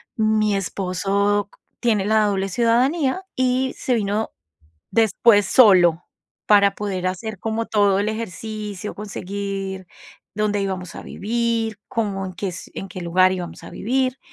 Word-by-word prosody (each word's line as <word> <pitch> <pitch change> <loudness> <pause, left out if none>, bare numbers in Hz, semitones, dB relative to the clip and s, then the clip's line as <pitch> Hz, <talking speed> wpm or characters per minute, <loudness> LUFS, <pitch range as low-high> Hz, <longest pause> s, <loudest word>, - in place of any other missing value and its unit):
mi 215 -2 +2
esposo 195 +2 0 0.3
tiene 215 -5 +1
la 215 0 +3
doble 195 -1 0
ciudadanía 260 - +1
y 260 0 +1
se 255 - -1
vino 210 0 -1 0.6
después 220 -1 +4
solo 180 -8 +5 0.4
para 200 -1 +5
poder 190 -3 -3
hacer 210 +2 -5
como 225 0 -2
todo 205 -2 +3
el 205 - 0
ejercicio, 215 -1 -5
conseguir 195 -1 -5 0.5
dónde 210 -1 0
íbamos 185 -2 -4
a - - -8
vivir, 225 -1 -2
cómo, 200 -4 -2
en 185 - -8
qué 195 +3 -3
es 175 - -8
en 195 - -6
qué 185 - -8
lugar 185 +2 +4
íbamos 180 -2 -6
a - - -9
vivir. 255 +3 -1
205 Hz, 140 wpm, -22 LUFS, 195-225 Hz, 0.6 s, solo